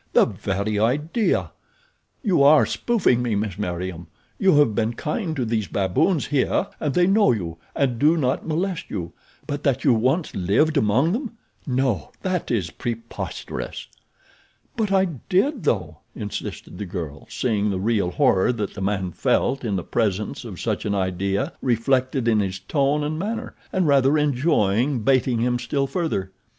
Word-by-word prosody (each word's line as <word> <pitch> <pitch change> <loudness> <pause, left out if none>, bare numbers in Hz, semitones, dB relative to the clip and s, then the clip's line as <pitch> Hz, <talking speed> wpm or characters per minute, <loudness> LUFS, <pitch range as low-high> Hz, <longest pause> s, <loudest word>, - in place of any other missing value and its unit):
The - - +6
very 100 +2 -2
idea! 150 - +1 0.7
You 190 - +3
are 145 +2 +7
spoofing 200 - +1
me, 120 -3 0
Miss 100 -2 -2
Meriem. 90 -3 -4 0.3
You 190 -5 +4
have 145 -7 +4
been 115 +2 0
kind 160 - -2
to 130 -4 -1
these 110 -3 -1
baboons 100 - +1
here 145 -3 +1
and 145 -3 -1
they 180 - +5
know 200 -5 +4
you 85 -8 -3 0.2
and 125 -4 0
do 155 +5 +4
not 130 -1 0
molest 175 +3 -2
you; 85 -2 -5 0.3
but 145 0 -4
that 135 -2 0
you 135 - +5
once 130 +9 +1
lived 105 - +2
among 130 +5 +3
them—no, 140 - -3
that 185 -3 -1
is 95 -8 -1
preposterous." 115 -1 -5 0.9
"But 215 -4 -1
I 190 -1 +4
did, 185 - -1
though," 85 - -1 0.2
insisted 105 -3 -6
the 105 - -4
girl, 80 -6 -6
seeing 105 -4 0
the 95 -2 -1
real 105 -3 +1
horror 95 +3 +3
that 105 -4 -3
the 100 - -7
man 95 -2 -1
felt 135 +9 +1
in 105 -4 -1
the 90 - -2
presence 105 -1 -1
of - - -8
such - - -2
an 100 - -1
idea 95 - -1
reflected 130 +1 +1
in 110 -2 +4
his 95 -2 -1
tone 140 - 0
and 155 +2 -2
manner, 225 +6 -3 0.2
and 185 -2 +1
rather 140 +1 +4
enjoying 135 - +2
baiting 130 -2 +2
him 120 0 +1
still 135 +3 -1
further. 135 - -2
125 Hz, 160 wpm, -23 LUFS, 100-150 Hz, 0.9 s, are